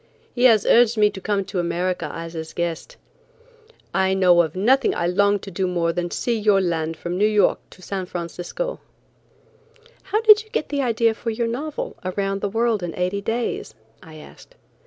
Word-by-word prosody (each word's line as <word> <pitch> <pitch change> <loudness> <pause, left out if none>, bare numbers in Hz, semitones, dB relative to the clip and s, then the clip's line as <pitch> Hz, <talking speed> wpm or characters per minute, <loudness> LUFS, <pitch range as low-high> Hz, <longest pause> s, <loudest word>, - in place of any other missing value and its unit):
He 245 0 +1
has 220 -5 +5
urged 235 -1 +4
me 210 -1 +4
to 190 - -9
come 200 -1 -1
to 195 -1 -4
America 175 +1 -2
as 165 0 -7
his 160 -1 -7
guest. 170 - -4 1.0
I 190 0 +2
know 180 -2 +5
of 160 -1 -3
nothing 250 +8 +3
that - - -5
I 170 - 0
long 200 +3 +2
to 195 0 -10
do 185 +1 -1
more 170 -2 0
than 175 0 -2
to - - -5
see 240 - 0
your 210 -2 +3
land 165 -3 -2
from 175 +2 -4
New 210 - +4
York 210 -1 +2
to 185 - -17
San 190 -1 -4
Francisco." 175 - -5 1.3
"How 395 +3 0
did 430 -1 +7
you 435 - -24
get 310 - -3
the 285 -1 -1
idea 230 -2 +2
for 230 +1 -5
your 230 +1 -1
novel, 280 +7 -4
'Around 195 +1 -2
the 205 - -1
World 225 0 0
in 175 -2 -5
Eighty 180 +3 -1
Days?'" 225 - -3 0.3
I 160 -1 -13
asked. 155 - -15
195 Hz, 200 wpm, -22 LUFS, 175-230 Hz, 1.3 s, did